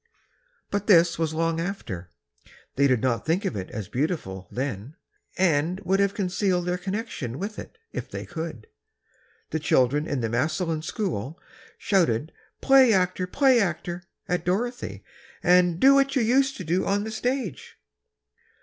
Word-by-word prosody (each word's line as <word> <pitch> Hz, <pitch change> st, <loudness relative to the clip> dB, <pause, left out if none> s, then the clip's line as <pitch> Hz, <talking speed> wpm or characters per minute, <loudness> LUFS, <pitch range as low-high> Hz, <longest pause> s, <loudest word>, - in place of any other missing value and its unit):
But 205 Hz, 0 st, -2 dB
this 170 Hz, -5 st, +5 dB
was 160 Hz, -2 st, 0 dB
long 165 Hz, 0 st, 0 dB
after. 120 Hz, -, -5 dB, 0.7 s
They 140 Hz, +1 st, +4 dB
did 125 Hz, -4 st, +2 dB
not 120 Hz, -4 st, +1 dB
think 175 Hz, +6 st, 0 dB
of 135 Hz, -, -1 dB
it 95 Hz, -2 st, -5 dB
as 105 Hz, -3 st, -6 dB
beautiful, 105 Hz, -, -3 dB
then, 130 Hz, +1 st, -4 dB, 0.4 s
and 175 Hz, 0 st, +2 dB
would 195 Hz, +1 st, +1 dB
have 200 Hz, 0 st, +2 dB
concealed 185 Hz, -2 st, 0 dB
their 180 Hz, 0 st, -1 dB
connection 190 Hz, -, -4 dB
with 205 Hz, +5 st, -5 dB
it, -, -, -10 dB, 0.2 s
if -, -, -5 dB
they -, -, -6 dB
could. 160 Hz, -10 st, -6 dB, 0.9 s
The 160 Hz, -, -1 dB
children 145 Hz, 0 st, +2 dB
in 140 Hz, -3 st, -2 dB
the 115 Hz, -, 0 dB
Massillon 155 Hz, -, -1 dB
school 160 Hz, -, -3 dB, 0.4 s
shouted 160 Hz, -, +1 dB, 0.3 s
"Play 270 Hz, -3 st, +6 dB
actor! 185 Hz, -1 st, +1 dB
Play 265 Hz, +4 st, +4 dB
actor!" 175 Hz, -2 st, -2 dB, 0.3 s
at 180 Hz, -2 st, -1 dB
Dorothy, 240 Hz, +8 st, -2 dB, 0.4 s
and 180 Hz, -1 st, +4 dB
"Do 270 Hz, +1 st, +7 dB
what 275 Hz, 0 st, +3 dB
you 260 Hz, -, +3 dB
used 265 Hz, +4 st, +2 dB
to 185 Hz, -, -6 dB
do 175 Hz, +3 st, 0 dB
on 200 Hz, +1 st, +1 dB
the 220 Hz, -, -5 dB
stage!" 240 Hz, -, -3 dB
175 Hz, 155 wpm, -25 LUFS, 145-200 Hz, 0.9 s, Do